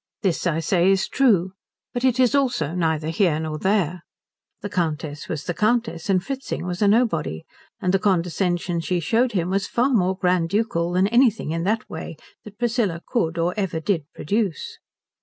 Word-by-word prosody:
This, 185 -2 0
I 165 -1 0
say, 175 +2 +2
is 195 -1 +2
true; 195 -9 +2 0.4
but 245 0 -3
it 260 -1 +2
is 255 -1 +4
also 245 - +1
neither 160 -3 0
here 165 -2 +2
nor 155 -1 -4
there. 185 -3 0 0.6
The 205 - -3
Countess 155 -4 -3
was 155 -2 -3
the 175 - -3
Countess, 215 -4 0
and 185 -2 +2
Fritzing 270 -5 -4
was 180 +1 -4
a 205 - +4
nobody, 200 - +1 0.4
and 180 0 0
the 195 - +3
condescension 175 -2 0
she 175 +2 -1
showed 235 +8 +1
him 180 -2 0
was 195 +1 0
far 245 +3 +1
more 190 -4 +2
grand 180 -3 +1
ducal 190 -4 0
than 185 +1 +3
anything 235 - +3
in 165 +1 -2
that 215 +3 0
way 160 -1 -7 0.3
that 205 -1 -12
Priscilla 230 -8 0
could 170 -9 -1
or 170 +2 +1
ever 190 -6 -2
did 160 -2 -1
produce. 200 -1 -2
185 Hz, 180 wpm, -23 LUFS, 165-215 Hz, 0.6 s, is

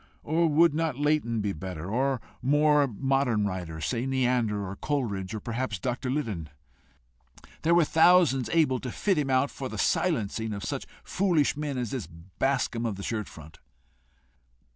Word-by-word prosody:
Or 165 +2 +2
would 160 +1 +4
not 160 -4 -1
Leighton 145 -6 +1
be 100 -1 -1
better? 90 -1 -6
Or 135 +4 +1
a 125 - -5 0.2
more 145 +1 +4
modern 130 -2 0
writer 90 -5 -4
say 115 - -2
Neander, 120 -6 0
or 95 - -6
Coleridge, 110 -8 -2
or - - -3
perhaps 115 -1 -3
Dr. 125 +6 -3
Liddon? 110 - -3 1.1
There 165 +1 +3
were 170 -2 +5
thousands 160 -7 +4
able 150 -6 +2
to 125 - -5
fit 195 - 0
him 140 -2 -1
out 130 +2 +2
for 130 -2 -6
the - - -6
silencing 110 - 0
of 100 0 -5
such - - -4 0.2
foolish 175 -7 +1
men 145 -2 -3
as 120 -4 -3
this 125 - -4
Bascombe 115 +8 -2
of 105 - -3
the 100 - -8
shirt 110 -2 -3
front! 80 -1 -13
125 Hz, 165 wpm, -27 LUFS, 105-145 Hz, 1.1 s, were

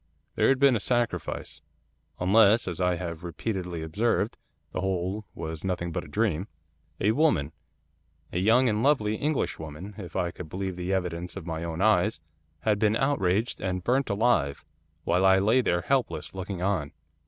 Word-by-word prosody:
'There - - +3
had 135 - +4
been 135 -2 +5
a - - +1
sacrifice, 120 +2 -2 0.6
unless, 105 +4 +5
as 90 -1 -3
I 90 0 +2
have 85 -1 -5
repeatedly 90 -1 -4
observed, 105 +6 0 0.4
the - - -3
whole 95 +2 -2
was 80 -1 -6
nothing 90 -2 -2
but - - -3
a - - -11
dream. 95 +2 0 0.5
A 105 - +3
woman 110 - +2 0.8
a 90 - 0
young 115 +7 +4
and 105 -1 +1
lovely 115 -6 +3
Englishwoman, 100 - -3
if 90 -5 -8
I 85 -1 0
could 85 -3 -9
believe 95 +1 -3
the 90 +1 -3
evidence 90 -2 -2
of 95 -4 -7
my 80 -1 -4
own 85 +2 -2
eyes, 110 -4 +3 0.4
had 105 +1 +1
been 110 0 +3
outraged, 115 -5 +1
and 90 -1 -2
burnt 130 +5 +1
alive, 100 - +1 0.4
while 90 +2 +2
I 95 0 +6
lay 110 +7 +4
there 85 -6 +1
helpless, 135 +6 -1
looking 95 -1 -5
on. 90 -7 -1
95 Hz, 165 wpm, -27 LUFS, 85-110 Hz, 0.8 s, I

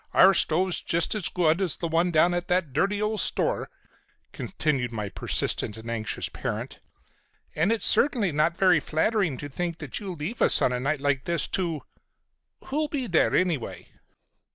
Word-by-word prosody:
Our 195 +1 +7
stove's 180 +1 +1
just 170 0 0
as 210 -5 -1
good 170 0 +1
as 180 -6 -1
the 170 - -3
one 165 +2 +1
down 170 +1 +3
at 175 0 -2
that 180 -6 0
dirty 200 +8 +1
old 210 0 -1
store," - - 0 0.6
continued 135 -6 -2
my 105 -3 -4
persistent 105 +2 0
and 115 +1 -7
anxious 110 -2 -2
parent, - - -5 0.7
"and 165 +7 +1
it's 230 -3 +1
certainly 235 - +3
not 155 +3 +1
very 185 -4 +4
flattering 160 - 0
to 145 - -6
think 170 +4 -4
that 145 -4 -6
you 195 -4 -6
leave 170 +10 -5
us - - +4
on 125 - +2
a 125 - -1
night 140 +2 -1
like 140 -2 0
this 170 -3 0
to—Who'll 185 - -5
be 285 -4 -3
there, 175 -8 +2
anyway?" 170 -9 -1
170 Hz, 170 wpm, -26 LUFS, 145-190 Hz, 0.7 s, Our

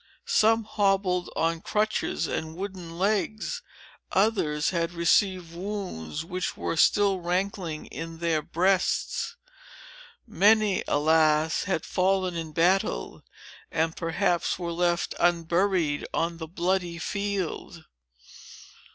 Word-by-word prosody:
Some 225 +1 +3
hobbled 195 -4 +1
on 165 0 0
crutches 215 -5 0
and 160 0 -4
wooden 180 -3 -6
legs; 215 - -1 0.5
others 185 -8 +1
had 170 -1 -1
received 175 0 +2
wounds, 175 - -5
which 180 +2 -3
were - - -2
still 195 +3 +3
rankling 180 -2 -2
in 165 +3 -7
their 165 -2 0
breasts. 185 - 0 0.9
Many, 215 -2 +3
alas! 155 +1 +3
had 190 -4 -1
fallen 185 0 +1
in 165 -2 -4
battle, 165 - +1 0.5
and 160 +1 0
perhaps 170 +1 0
were 170 -2 -4
left 175 0 0
unburied 170 -2 +1
on 165 0 -1
the 160 -1 -6
bloody 175 0 -1
field." 195 -3 -3
175 Hz, 105 wpm, -27 LUFS, 165-195 Hz, 0.9 s, Some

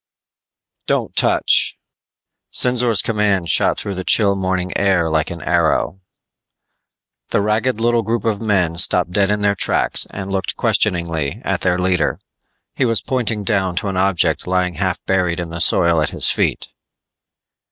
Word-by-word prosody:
_ - - -66
"Don't - - -1
touch!" - - +2 0.7
Sinzor's 125 -5 +2
command 105 -6 0
shot - - +2
through 100 - -4
the 95 0 -5
chill 100 +1 +3
morning 95 -1 -2
air 95 -5 +1
like 80 0 0
an 85 -2 -8
arrow. 85 +2 0 1.3
The - - +1
ragged 110 +3 0
little 120 0 +1
group 115 +1 -3
of 110 -3 -1
men 90 -6 0
stopped 90 -1 +2
dead 100 +1 +1
in 105 0 -1
their 100 0 +2
tracks - - +1
and 100 0 -7
looked 95 -1 -3
questioningly 85 -5 0
at - - -1
their 90 -1 +1
leader. 90 -2 0 0.5
He - - -1
was 115 -3 +3
pointing 115 -5 -2
down 95 -3 -1
to 95 +3 -2
an 95 - -4
object 95 -2 +1
lying 90 -1 0
half - - -2
buried 90 -2 0
in 85 -1 -5
the 85 +1 -4
soil 85 0 +3
at 75 - 0
his - - +3
feet. - - -1
95 Hz, 160 wpm, -18 LUFS, 85-105 Hz, 1.3 s, chill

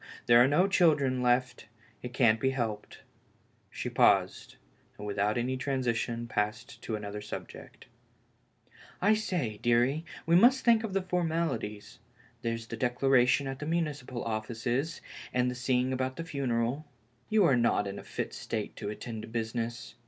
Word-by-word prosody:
there 120 0 +7
are - - +4
no 160 +7 +3
children 145 -9 +3
left 125 -1 +1 0.2
— 120 -2 -30
it 125 - -6
can't 115 -3 +3
be 130 - +2
helped.'^ 115 -6 -4 0.7
She - - -5
paused, - - +2 0.4
and 105 - -8
without 105 +2 0
any 125 +2 -1
transition 120 -3 -1
passed 105 +1 -3
to 110 - -3
another 105 0 -6
subject. 105 - -9 1.1
I 205 +4 +4
say, 175 - -2
deary, 120 +6 +2 0.2
we 165 - +3
must 250 +8 +5
think 230 -2 +5
of 215 -4 -4
the 195 -1 0
formalities 160 - -2 0.2
— 120 0 -30
there's 115 -1 -3
the 115 +1 -7
declaration 125 +2 +3
at 135 0 -5
the 150 - -5
municipal 150 -7 -2
offices, 120 +7 -2 0.3
and 125 0 +2
the - - -4
seeing 125 +1 0
about 130 0 -2
the 165 - -5
funeral. 135 -1 -2 0.4
You 215 -3 +4
are 140 - +4
not 120 -3 +2
in 100 0 -5
a - - -10
fit - - -5
state - - -4
to - - -4
attend 110 +1 -6
to - - -9
business. 115 +1 -4
125 Hz, 160 wpm, -30 LUFS, 115-145 Hz, 1.1 s, there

